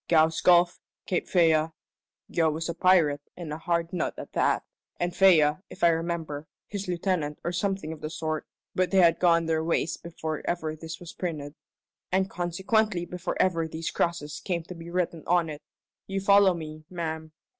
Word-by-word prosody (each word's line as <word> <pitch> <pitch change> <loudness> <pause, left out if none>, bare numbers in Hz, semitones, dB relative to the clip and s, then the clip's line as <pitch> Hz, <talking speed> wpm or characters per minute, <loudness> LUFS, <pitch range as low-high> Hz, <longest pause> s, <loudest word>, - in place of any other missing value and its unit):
'Gow's 160 -1 +4
Gulf,' 175 0 +5 0.3
'Cape 180 - -1
Fea' 160 -3 +4 0.6
Gow 165 -2 +3
was 160 +2 -3
a 170 - -2
pirate 165 -5 +4 0.2
and 165 -4 -5
a 155 - -5
hard 170 0 -1
nut 175 - -1
at - - -8
that; - - +2 0.4
and 175 0 -1
Fea, 155 -6 +6
if - - -10
I 170 - +8
remember, 165 -2 -2 0.2
his 200 -2 -5
lieutenant 175 -4 -1
or 170 - -1
something 190 -3 -2
of 155 - -12
the 155 - -3
sort; 155 -1 -3 0.3
but 185 -1 +1
they 195 - +1
had 170 -3 +5
gone 170 -2 +4
their 160 -1 +1
ways 165 0 0
before 160 -2 -5
ever 160 -3 -2
this 160 0 -8
was 175 -2 -9
printed, 150 -5 -4 0.6
and 190 +1 +1
consequently 180 +2 0
before 180 +1 -4
ever 165 -3 +2
these 160 +1 -4
crosses 150 -4 -2
came 175 -3 -1
to 180 - -9
be 170 -1 -9
written 170 -2 -1
on 170 -2 +2
it. 150 - -8 0.5
You 195 0 -2
follow 200 -1 +5
me, 155 -1 -7
ma'am?" 160 -3 -4
170 Hz, 180 wpm, -27 LUFS, 160-180 Hz, 0.6 s, I